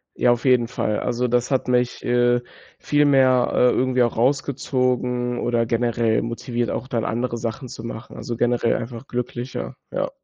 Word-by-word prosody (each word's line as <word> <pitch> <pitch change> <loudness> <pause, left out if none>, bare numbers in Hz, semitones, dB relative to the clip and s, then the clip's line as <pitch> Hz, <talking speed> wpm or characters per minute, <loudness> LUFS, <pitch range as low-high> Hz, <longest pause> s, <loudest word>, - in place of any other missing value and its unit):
Ja, 120 - +3
auf 120 +2 -1
jeden 125 -3 +4
Fall. 105 -3 -1
Also, 125 0 -1
das 125 +2 0
hat 130 -1 +1
mich, 125 -1 0
äh, 120 0 +2 0.4
viel 145 0 +2
mehr, 130 -3 +4
äh, 125 - +4
irgendwie 130 0 +1
auch 120 - -1
rausgezogen 125 -2 0
oder 120 -1 +1
generell 115 -1 +1
motiviert, 120 +1 -3
auch 130 - -4
dann 115 -4 -2
andere 120 +1 -2
Sachen 115 +3 -4
zu 115 - -9
machen, 115 0 -8
also 120 - -4
generell 120 0 +1
einfach 115 +2 -7
glücklicher, 125 +1 -4 0.2
ja. - - -1
120 Hz, 170 wpm, -22 LUFS, 120-125 Hz, 0.4 s, jeden